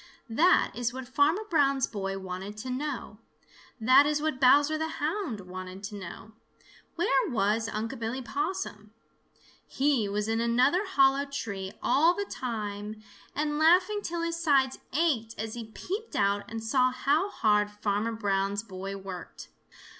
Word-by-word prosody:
That 340 +11 +4
is 235 +2 -1
what 260 0 -7
Farmer 295 - +2
Brown's 275 - +3
boy 195 -2 -4
wanted 190 +2 -6
to 255 +4 -5
know. 255 -5 -4 0.6
That 260 +6 +6
is 300 0 +1
what 305 -3 -2
Bowser 285 +4 +5
the 315 +1 -1
Hound 305 - -2
wanted 185 +1 -8
to 205 +1 -6
know. 200 +2 -9 0.6
Where 300 -6 +2
was 220 0 +1
Unc' 225 +1 -4
Billy 230 +3 -3
Possum? 245 - -4 0.7
He 265 -7 +1
was 210 +1 -1
in 225 +1 0
another 255 - +2
hollow 275 -5 +3
tree 200 -8 -5
all 330 +5 +4
the 405 - -2
time 215 - -5 0.3
and 295 0 -1
laughing 365 +6 +4
till 340 -3 -3
his 335 0 -2
sides 275 -5 +3
ached 265 -8 0
as 220 0 -3
he 235 -2 -6
peeped 395 - -6
out 200 0 +1
and 225 0 -5
saw 255 +2 +3
how 285 +9 +1
hard 210 - +2
Farmer 210 +2 -1
Brown's 200 -1 0
boy 195 -1 -6
worked. 190 -3 -9
240 Hz, 150 wpm, -28 LUFS, 210-295 Hz, 0.7 s, That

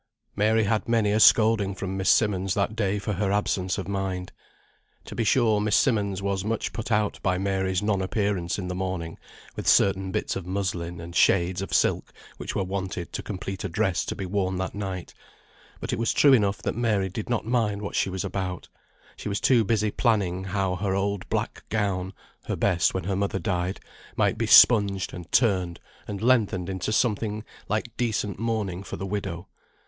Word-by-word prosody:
Mary 110 +2 +3
had 110 +2 0
many 110 -3 +2
a 105 - +2
scolding 110 -3 +5
from 95 -1 -4
Miss 95 0 0
Simmonds 95 -4 +2
that 105 +1 0
day 105 -2 0
for 105 +1 -3
her 100 +1 0
absence 95 -2 0
of 95 -3 -4
mind. 95 -2 -3 0.7
To - - -8
be - - -1
sure 110 -1 +3
Miss 105 -1 +2
Simmonds 100 -7 +1
was 100 -1 -1
much 110 +1 -2
put 115 0 -5
out 105 -1 +1
by 90 -1 +1
Mary's 95 -1 -1
non 105 -2 +1
appearance 95 -3 -1
in 95 -3 -4
the 90 - -3
morning 90 -3 -4 0.4
with - - -5
certain 95 -1 +3
bits - - -2
of 95 - -4
muslin, 90 -3 -3
and 85 +1 -9
shades 90 0 +3
of 95 - -5
silk - - +1 0.3
which - - -5
were - - +1
wanted 95 -2 -4
to - - -3
complete 95 -1 -5
a - - -2
dress - - 0
to - - -4
be 95 - -5
worn 95 0 -1
that 95 0 -3
night; 95 -3 -5 0.7
but - - -4
it - - -2
was 115 - +1
true 140 -2 +6
enough 105 -5 +2
that - - -1
Mary 110 -5 +1
did 105 +4 -6
not 120 -3 -1
mind 110 -3 0
what 100 - -5
she - - +1
was 95 +1 -3
about; 90 -2 -4 0.5
she - - -6
was 100 - -1
too 120 -4 +4
busy 105 0 +1
planning 95 -7 0
how 95 -1 -1
her 95 0 -1
old 100 0 -2
black - - -2
gown 100 -4 -1 0.3
(her - - -2
best 85 -4 +2
when 95 - -1
her 95 +1 -1
mother 100 0 -1
died) 90 0 -2 0.4
might - - +2
be - - 0
spunged, 100 -5 +6
and 90 -1 -9
turned, 95 -8 +2 0.3
and 100 0 -5
lengthened 105 -7 +2
into 95 +2 -3
something 110 -2 0 0.3
like 110 +3 -2
decent 110 -5 -1
mourning 105 -5 -2
for 100 - -7
the 95 - -4
widow. 95 -3 -4
100 Hz, 195 wpm, -26 LUFS, 95-105 Hz, 0.7 s, true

